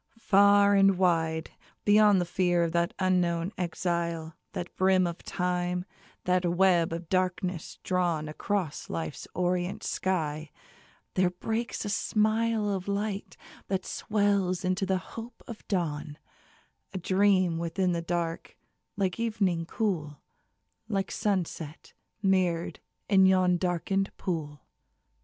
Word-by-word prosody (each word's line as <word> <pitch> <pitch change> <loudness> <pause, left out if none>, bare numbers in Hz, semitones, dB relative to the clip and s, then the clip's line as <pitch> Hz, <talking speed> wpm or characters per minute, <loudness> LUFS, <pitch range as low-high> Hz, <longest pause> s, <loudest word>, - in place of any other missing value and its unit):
Far 200 -1 +5
and 195 -1 +5
wide, 165 -3 +1 0.3
Beyond 210 -1 +6
the 175 - 0
fear 175 -1 +1
of 165 - 0
that 170 +1 0
unknown 180 -1 +1
exile, 170 -2 -2 0.2
That 175 - -5
brim 185 -1 +3
of 170 -1 -4
Time, 180 0 -1 0.4
that 180 0 +2
web 175 -1 +3
of 165 0 -5
darkness 185 -1 -1
drawn 175 -4 0
Across 170 +1 -3
Life's 80 -1 -4
orient 180 +1 -1
sky, 155 -5 -2 0.6
there 185 -1 +3
breaks 220 +6 -3
a - - -2
smile 215 +1 +1
Of 190 -1 -3
light 200 0 -3 0.3
that 190 -1 -2
swells 200 -3 0
into 185 +1 0
the 190 -1 +2
hope 230 +5 -9
of 230 -3 -9
dawn: 150 -5 -2 0.8
A - - 0
dream 185 -2 +2
within 180 +2 0
the 170 -1 -1
dark, 170 -1 -3 0.4
like 190 0 -1
evening 195 -7 0
cool, 165 -11 -2 0.7
Like 195 -3 -1
sunset 175 -6 -3 0.3
mirror'd 185 -3 +1 0.3
in 190 -2 +6
yon 185 -1 +4
darken'd 185 +2 0
pool. 150 -6 -4
180 Hz, 120 wpm, -28 LUFS, 170-195 Hz, 0.8 s, Beyond